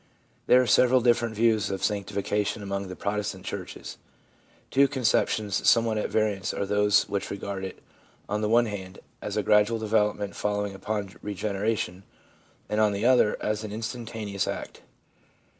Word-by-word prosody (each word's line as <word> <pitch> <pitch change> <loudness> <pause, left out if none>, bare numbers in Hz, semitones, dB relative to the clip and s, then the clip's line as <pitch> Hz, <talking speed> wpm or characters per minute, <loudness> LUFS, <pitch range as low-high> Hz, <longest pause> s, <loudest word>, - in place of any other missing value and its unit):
There 125 - +7
are 130 - +3
several 125 +1 +5
different 120 -1 +2
views 110 -2 +2
of 95 -1 -4
sanctification 105 0 -1
among 100 0 -3
the 90 - -7
Protestant 105 +2 -3
churches. - - -7 0.7
Two 140 +1 +5
conceptions 110 -6 +1
somewhat 115 -2 +3
at - - -2
variance 105 -4 0
are - - -1
those 105 0 +3
which 100 -1 -3
regard 100 -1 -5
it, 95 - -7 0.4
on 105 +1 -1
the 105 - 0
one 120 +1 +5
hand, 95 -4 -6 0.2
as - - -4
a - - +1
gradual 105 +2 +4
development 105 -2 0
following 105 -1 -1
upon 100 0 -4
regeneration, 100 -2 -2 0.7
and, 105 +1 0
on 105 -1 +3
the 100 +3 -2
other, 125 -4 +4
as 105 0 -1
an 105 - -6
instantaneous 110 -3 -4
act. - - -5
105 Hz, 155 wpm, -27 LUFS, 100-110 Hz, 0.7 s, There